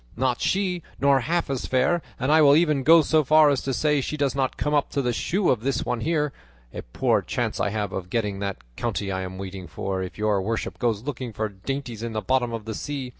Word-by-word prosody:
Not 125 Hz, -1 st, 0 dB
she; 185 Hz, -2 st, 0 dB, 0.2 s
nor 140 Hz, -1 st, +4 dB
half 170 Hz, +7 st, -1 dB
as 135 Hz, -2 st, -3 dB
fair; 130 Hz, +7 st, +2 dB, 0.2 s
and 130 Hz, +3 st, +1 dB
I 155 Hz, +1 st, +6 dB
will 145 Hz, -1 st, +7 dB
even 155 Hz, -4 st, +3 dB
go 165 Hz, +4 st, +7 dB
so 155 Hz, +1 st, +3 dB
far 155 Hz, +1 st, +6 dB
as 140 Hz, -, 0 dB
to 135 Hz, -, -2 dB
say 150 Hz, +2 st, +1 dB
she 150 Hz, -, -4 dB
does 140 Hz, -3 st, +1 dB
not 135 Hz, -1 st, -1 dB
come 150 Hz, -, -1 dB
up 145 Hz, -1 st, +2 dB
to 140 Hz, -, +1 dB
the 125 Hz, -1 st, 0 dB
shoe 185 Hz, -, +1 dB
of 125 Hz, -, +1 dB
this 135 Hz, +3 st, -1 dB
one 125 Hz, -, -1 dB
here. 150 Hz, 0 st, 0 dB, 0.4 s
A -, -, -5 dB
poor -, -, 0 dB
chance -, -, -2 dB
I -, -, +1 dB
have 105 Hz, -1 st, -3 dB
of 90 Hz, -1 st, -5 dB
getting 105 Hz, -2 st, -1 dB
that 100 Hz, -1 st, -3 dB, 0.2 s
county 105 Hz, -, -2 dB
I 95 Hz, 0 st, -2 dB
am 95 Hz, 0 st, -6 dB
waiting 95 Hz, -1 st, -7 dB
for 95 Hz, +4 st, -3 dB
if 95 Hz, -, -6 dB
your 105 Hz, -2 st, +1 dB
worship 110 Hz, +4 st, -3 dB
goes 115 Hz, -3 st, 0 dB
looking 130 Hz, -4 st, -5 dB
for 110 Hz, 0 st, -2 dB
dainties 120 Hz, +3 st, -5 dB
in 115 Hz, -1 st, -4 dB
the 110 Hz, -, -2 dB
bottom 125 Hz, -1 st, +1 dB
of 115 Hz, -2 st, -5 dB
the 110 Hz, -, -4 dB
sea. 135 Hz, +2 st, -4 dB
130 Hz, 245 wpm, -24 LUFS, 105-145 Hz, 0.4 s, will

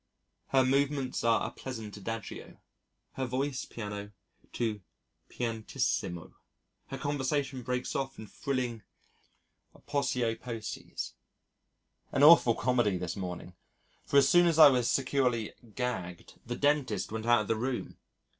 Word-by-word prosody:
Her 130 Hz, -1 st, +3 dB
movements 140 Hz, 0 st, +1 dB
are 115 Hz, -1 st, +3 dB
a -, -, -7 dB
pleasant 115 Hz, -5 st, -7 dB
adagio, 115 Hz, +1 st, -6 dB, 0.6 s
her 130 Hz, -, 0 dB
voice 130 Hz, +2 st, -2 dB
piano 105 Hz, -2 st, -6 dB, 0.4 s
to 110 Hz, -4 st, -2 dB, 0.5 s
pianissimo, 110 Hz, -7 st, -2 dB, 0.5 s
her 135 Hz, -, -6 dB
conversation 140 Hz, -1 st, -1 dB
breaks 125 Hz, +1 st, -3 dB
off 135 Hz, -1 st, -2 dB
in 110 Hz, -, -8 dB
thrilling 125 Hz, -1 st, -3 dB, 0.9 s
aposiopoeses. 125 Hz, -4 st, -3 dB, 1.0 s
An 140 Hz, -, +2 dB
awful 145 Hz, -7 st, +8 dB
comedy 120 Hz, -6 st, +1 dB
this 90 Hz, -1 st, -4 dB
morning 90 Hz, -1 st, -6 dB, 0.5 s
for 140 Hz, -, +1 dB
as 135 Hz, -1 st, +7 dB
soon 175 Hz, +4 st, +6 dB
as 165 Hz, -2 st, +2 dB
I 155 Hz, -2 st, +10 dB
was 125 Hz, -3 st, +2 dB
securely 125 Hz, -4 st, +1 dB, 0.2 s
"gagged" 95 Hz, -9 st, -4 dB
the 120 Hz, -, -2 dB
dentist 140 Hz, -11 st, +1 dB
went 110 Hz, +1 st, -4 dB
out 120 Hz, -2 st, +5 dB
of 105 Hz, -, -5 dB
the 115 Hz, -, +1 dB
room. 125 Hz, +3 st, -3 dB
125 Hz, 125 wpm, -30 LUFS, 110-135 Hz, 1.0 s, I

